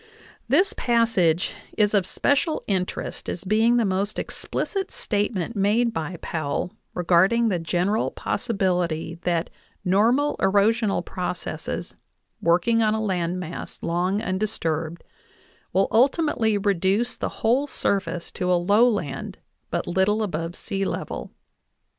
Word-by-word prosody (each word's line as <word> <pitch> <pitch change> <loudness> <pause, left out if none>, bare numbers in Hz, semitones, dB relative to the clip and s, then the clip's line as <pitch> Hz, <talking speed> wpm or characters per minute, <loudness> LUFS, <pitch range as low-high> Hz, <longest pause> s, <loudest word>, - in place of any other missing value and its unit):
This 385 +2 +3
passage 225 -8 +2 0.2
is 210 -1 +3
of 195 -3 +2
special 295 +3 +1
interest 185 -3 -2
as 175 - -4
being 220 +4 +3
the 235 - +3
most 195 +2 -1
explicit 390 -2 -3
statement 205 0 -1
made 220 +4 +2
by 165 0 -3
Powell 160 +2 -2 0.2
regarding 190 +7 +3
the 180 -4 0
general 180 +6 0
possibility 180 -7 -1
that 170 -1 -1 0.3
normal 230 +10 +3
erosional 205 +2 +2
processes, 180 -1 -4 0.5
working 180 +8 +3
on 215 -1 +3
a - - -1
land 185 -4 -1
mass 170 -2 -6
long 180 +5 0
undisturbed, 170 -5 -2 0.7
will 190 +2 +3
ultimately 245 -3 +3
reduce 200 +4 +1
the - - -3
whole 255 +6 +3
surface 180 -9 -2
to 180 0 -1
a - - +5
lowland 200 - +1 0.3
but - - -2
little 190 +5 +2
above 165 -3 -3
sealevel. 195 +1 -3
195 Hz, 115 wpm, -24 LUFS, 175-225 Hz, 0.7 s, a